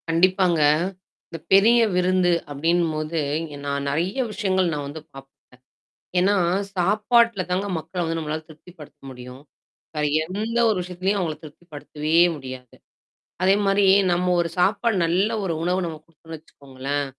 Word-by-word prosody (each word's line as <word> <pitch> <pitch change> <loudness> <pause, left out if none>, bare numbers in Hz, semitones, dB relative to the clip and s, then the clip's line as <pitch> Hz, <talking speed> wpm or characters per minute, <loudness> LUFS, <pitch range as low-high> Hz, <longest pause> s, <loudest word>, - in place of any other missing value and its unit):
கண்டிப்பாங்க. 180 0 +2 0.7
இந்த 165 - -8
பெரிய 225 +5 +6 0.2
விருந்து 180 0 +2 0.2
அப்படின்னும்போது, 160 +1 -1 0.5
நான் 140 0 -2
நெறைய 165 +7 -1 0.2
விஷயங்கள் 190 -4 0
நான் 145 -1 -4
வந்து 150 +2 -8
பாப்பேன். 135 0 -12 0.9
ஏன்னா, 195 +3 +3 0.4
சாப்பாட்டுல 210 +3 +2
தாங்க 185 +3 -1
மக்கள 180 +3 -5
வந்து 165 0 -2
நம்மளால 155 0 -4
திருப்தி 155 +3 -15
படுத்த 150 -1 -14
முடியும். 125 +1 -11 0.5
வேற 150 - 0 0.2
எந்த 210 +7 -4
ஒரு 215 - 0
விஷயத்தலயும் 185 +3 -2
அவங்கள 160 -4 -2
திருப்திப்படுத்தவே 150 0 -6 0.2
முடியாது. 130 -3 -10 0.7
அதே 190 +1 +5
மாரி, 195 0 +3 0.3
நம்ம 175 +1 0
ஒரு 170 - -3
சாப்பாடு, 215 +4 +2
நல்ல 180 +6 +1
ஒரு 180 -4 -1
உணவு, 180 +2 0
நம்ம 160 -2 -5
குடுத்தோம்னு 165 0 -12
வெச்சுக்கோங்களேன், 140 -1 -5
170 Hz, 135 wpm, -23 LUFS, 150-185 Hz, 0.9 s, பெரிய